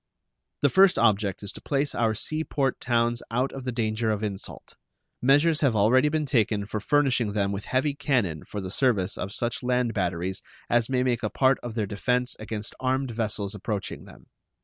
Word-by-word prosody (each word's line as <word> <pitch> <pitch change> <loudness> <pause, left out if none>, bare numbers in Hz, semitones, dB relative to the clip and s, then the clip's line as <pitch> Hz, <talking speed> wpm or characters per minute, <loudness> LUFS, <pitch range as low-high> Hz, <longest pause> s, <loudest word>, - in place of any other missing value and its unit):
The 145 - +4
first 190 +4 +5
object 105 -4 +2
is 100 - -4
to - - -12
place 140 0 -1
our 110 -2 +1
sea 155 +8 -2
port 135 -4 -1
towns 120 -1 +1
out 125 +4 0
of 135 -1 -8
the 125 - -1
danger 110 -1 -1
of 105 0 -1
insult. 100 -2 -6 0.5
Measures 145 +5 +4
have 135 -5 +3
been 105 - +1
already 130 +8 +4 0.2
taken 110 -6 +1
for 110 +1 -4
furnishing 125 -3 +1
them 100 -2 0
with 100 +1 -4
heavy 135 +3 0
cannon 120 - 0
for 105 - -6
the 95 -1 -6
service 105 -6 +1
of 95 - -5
such 120 +3 -1
land 125 -1 0
batteries 90 -1 -2 0.3
as 120 0 +3
may 130 -1 +1
make 120 -2 0
a 110 - -1
part 130 +3 +2
of 120 -2 -6
their 110 -3 0
defense 125 +5 0
against 110 0 -4
armed 130 0 0
vessels 110 -3 -2
approaching 105 -1 -4
them. - - -15
115 Hz, 195 wpm, -26 LUFS, 105-130 Hz, 0.5 s, first